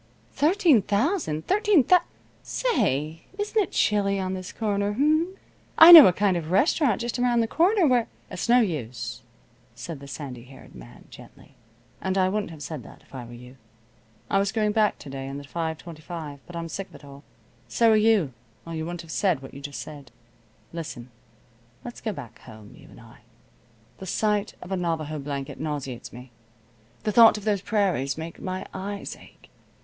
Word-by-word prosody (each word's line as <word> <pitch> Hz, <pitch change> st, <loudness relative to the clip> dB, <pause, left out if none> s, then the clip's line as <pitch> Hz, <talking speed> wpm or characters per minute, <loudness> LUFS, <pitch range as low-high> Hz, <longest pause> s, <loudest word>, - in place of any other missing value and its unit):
"Thirteen 320 Hz, -, +4 dB
thousand! 205 Hz, -, -1 dB
Thirteen 415 Hz, -, +3 dB
thous 360 Hz, +6 st, +5 dB, 0.4 s
Say, 165 Hz, -, -1 dB
isn't 425 Hz, +1 st, 0 dB
it 385 Hz, -, -3 dB
chilly 200 Hz, -1 st, +1 dB
on 185 Hz, 0 st, -2 dB
this 185 Hz, 0 st, -6 dB
corner, 205 Hz, -2 st, -1 dB
h'm? 310 Hz, -, +1 dB, 0.4 s
I 325 Hz, +2 st, +11 dB
know 325 Hz, -4 st, +13 dB
a -, -, +5 dB
kind 195 Hz, +1 st, +1 dB
of 165 Hz, -3 st, -3 dB
a -, -, -8 dB
restaurant 245 Hz, -, +2 dB
just 240 Hz, +1 st, -3 dB
around 245 Hz, -1 st, +2 dB
the 225 Hz, -, 0 dB
corner 365 Hz, -, +3 dB
where 250 Hz, -5 st, +2 dB
" -, -, -32 dB
"It's -, -, -4 dB
no 245 Hz, +1 st, +6 dB
use," 140 Hz, -, -4 dB, 0.5 s
said 165 Hz, -4 st, -7 dB
the 140 Hz, -, -11 dB
sandy 130 Hz, -4 st, -8 dB
haired 130 Hz, +1 st, -15 dB
man, -, -, -14 dB
gently. -, -, -15 dB, 0.5 s
"And 190 Hz, 0 st, -1 dB
I 185 Hz, -1 st, +3 dB
wouldn't 210 Hz, 0 st, -2 dB
have 155 Hz, -3 st, -9 dB
said 150 Hz, -1 st, -6 dB
that, -, -, -15 dB
if -, -, -25 dB
I 125 Hz, -3 st, -7 dB
were 120 Hz, -, -12 dB
you. 125 Hz, +2 st, -13 dB, 0.7 s
I 195 Hz, -, +2 dB
was 200 Hz, 0 st, 0 dB
going 215 Hz, -2 st, +1 dB
back 215 Hz, -1 st, +2 dB
to 145 Hz, -, -11 dB
day 135 Hz, 0 st, -6 dB
on 135 Hz, -, -6 dB
the 145 Hz, -, -8 dB
5:25, 160 Hz, -1 st, -6 dB
but 175 Hz, -, -10 dB
I'm 170 Hz, 0 st, -4 dB
sick 190 Hz, +4 st, -6 dB
of -, -, -17 dB
it -, -, -14 dB
all. 140 Hz, 0 st, -13 dB, 0.4 s
So 230 Hz, -1 st, +3 dB
are -, -, +5 dB
you, 215 Hz, -, +3 dB, 0.3 s
or 165 Hz, -, -7 dB
you 160 Hz, -1 st, -3 dB
wouldn't 175 Hz, 0 st, -6 dB
have 165 Hz, -, -11 dB
said 175 Hz, -8 st, 0 dB
what 135 Hz, -, -11 dB
you 140 Hz, -, -10 dB
just 140 Hz, 0 st, -6 dB
said. 145 Hz, -4 st, -11 dB, 0.6 s
Listen. 140 Hz, -7 st, -7 dB, 0.7 s
Let's 240 Hz, -, -8 dB
go 220 Hz, -, -2 dB
back 140 Hz, -, -10 dB
home, 110 Hz, -1 st, -14 dB
you -, -, -16 dB
and -, -, -15 dB
I. -, -, -16 dB, 0.8 s
The 190 Hz, -, -8 dB
sight 210 Hz, +1 st, 0 dB
of 180 Hz, -, -11 dB
a -, -, +1 dB
Navajo 160 Hz, -3 st, -2 dB
blanket 140 Hz, -2 st, -6 dB
nauseates 145 Hz, -5 st, -5 dB
me. 125 Hz, +1 st, -12 dB, 0.7 s
The 215 Hz, -, 0 dB
thought 225 Hz, 0 st, +7 dB
of 210 Hz, -, -8 dB
those 205 Hz, -3 st, +1 dB
prairies 185 Hz, -, 0 dB
makes 165 Hz, +1 st, -7 dB
my 185 Hz, 0 st, -5 dB
eyes 200 Hz, +1 st, -5 dB
ache. -, -, -19 dB
185 Hz, 195 wpm, -25 LUFS, 145-225 Hz, 0.8 s, know